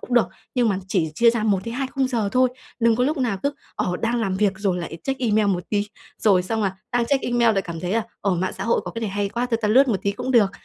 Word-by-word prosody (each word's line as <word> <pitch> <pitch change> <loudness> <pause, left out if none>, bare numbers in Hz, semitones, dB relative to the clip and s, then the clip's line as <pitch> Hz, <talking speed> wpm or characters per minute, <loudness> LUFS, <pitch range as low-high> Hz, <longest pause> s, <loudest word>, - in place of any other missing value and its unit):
cũng 250 - -4
được. 240 - +4 0.3
Nhưng 245 -3 +3
mà 195 - 0
chỉ 170 -5 0
chia 235 +6 +5
ra 230 -2 -2
1-2 230 +6 0
khung 270 -1 +1
giờ 230 -5 0
thôi. 255 0 +4 0.3
Đừng 230 -1 +4
có 250 - +2
lúc 300 +3 0
nào 230 -7 0
cứ, 280 - +1 0.2
ờ, 180 - -1
đang 235 +1 +1
làm 195 -4 -1
việc 205 -1 +2
rồi 195 -4 0
lại 170 -1 -6
check 270 -1 -2
email 215 -3 +2
một 180 -3 0
tí, 205 -1 0 0.3
rồi 190 -4 +4
xong 220 +3 -2
là 190 -1 -1 0.2
đang 240 -1 +2
check 275 0 +1
email 240 -2 +3
lại 195 - +1
cảm 165 -2 -6
thấy 180 +2 -2
là, 230 - +2 0.2
ờ, 195 -2 +1
mạng 185 +2 -1
xã - - -5
hội 230 - +2
có - - -4
cái 230 - -6
này 220 -3 -2
hay 200 0 -1
quá, 240 +4 -2
thôi 230 - +1
ta 210 - +2
lướt 265 +5 +5
một 220 - +2
tí 200 - 0
cũng 250 +5 -4
được. 220 -6 +5
220 Hz, 295 wpm, -23 LUFS, 195-240 Hz, 0.3 s, chia